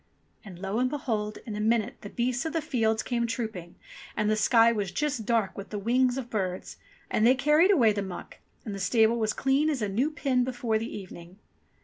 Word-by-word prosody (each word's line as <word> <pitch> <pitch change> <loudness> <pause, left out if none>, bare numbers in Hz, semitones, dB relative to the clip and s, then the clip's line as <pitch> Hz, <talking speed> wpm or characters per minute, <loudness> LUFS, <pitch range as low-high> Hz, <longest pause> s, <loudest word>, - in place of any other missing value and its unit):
'* - - -40
And 195 -5 -11
lo 195 +4 -2
and 255 0 +2
behold! 220 -7 -3
in 215 - -5
a - - -4
minute 225 +2 +1
the 205 - -8
beasts 245 +3 -1
of 320 - -3
the 330 - +1
fields 225 -7 0
came 235 -1 -1
trooping, 220 -7 -5 0.4
and 215 0 +1
the - - +3
sky 230 +2 +5
was 205 -5 -2
just 270 -6 -2
dark 225 -5 +1
with 200 +1 -8
the 210 - -4
wings 245 +4 +2
of 260 -3 -4
birds, 190 -5 -4 0.3
and 215 - +1
they 250 +3 +6
carried 300 +6 +4
away 240 - +5
the 205 - -2
muck, 190 -2 -8 0.3
and 210 - -4
the 195 - -5
stable 220 +4 +3
was 215 -1 +1
clean 275 +6 +1
as 275 -7 -1
a - - 0
new 235 +9 0
pin 275 -5 0
before 245 -3 -1
the 225 +2 -5
evening. 180 -2 -10
225 Hz, 225 wpm, -27 LUFS, 210-255 Hz, 0.4 s, they